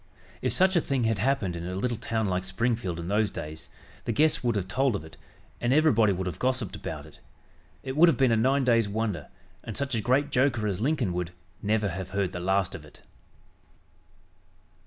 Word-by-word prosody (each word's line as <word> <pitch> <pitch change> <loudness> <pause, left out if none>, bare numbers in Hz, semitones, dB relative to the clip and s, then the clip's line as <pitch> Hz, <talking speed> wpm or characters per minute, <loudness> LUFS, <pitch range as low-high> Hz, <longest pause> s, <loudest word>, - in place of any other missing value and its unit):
If - - 0
such 190 0 +4
a 170 - +4
thing 135 -4 -1
had 110 -3 +1
happened 105 -7 0
in 85 +1 -5
a 90 - -4
little 120 +5 -1
town 110 0 -2
like 90 -2 -1
Springfield 95 -2 -1
in 85 - -5
those 105 +2 +2
days, 80 -3 -8 0.4
the - - 0
guests 150 +5 +2
would 120 -2 +1
have 95 -3 -1
told 130 +3 +1
of 80 - -5
it, 80 - -13 0.4
and 120 - 0
everybody 130 -8 +4
would 95 0 -2
have 90 - -4
gossiped 130 -5 -1
about - - -6
it. - - -16 0.6
It 130 0 -4
would 170 +3 +7
have - - +1
been 130 -3 +4
a - - +4
nine 130 +5 +2
days' 115 -4 +3
wonder, 105 -8 -2 0.4
and 110 - -6
such 140 0 -2
a 115 - 0
great 135 +5 +1
joker 125 -4 +2
as 100 -1 -1
Lincoln 130 - +1
would 90 -1 -2 0.3
"never 105 0 +1
have 95 +1 -5
heard 95 -3 +1
the 90 - -5
last 95 +1 +1
of 90 -6 -8
it." 75 - -17
110 Hz, 210 wpm, -27 LUFS, 95-130 Hz, 0.6 s, would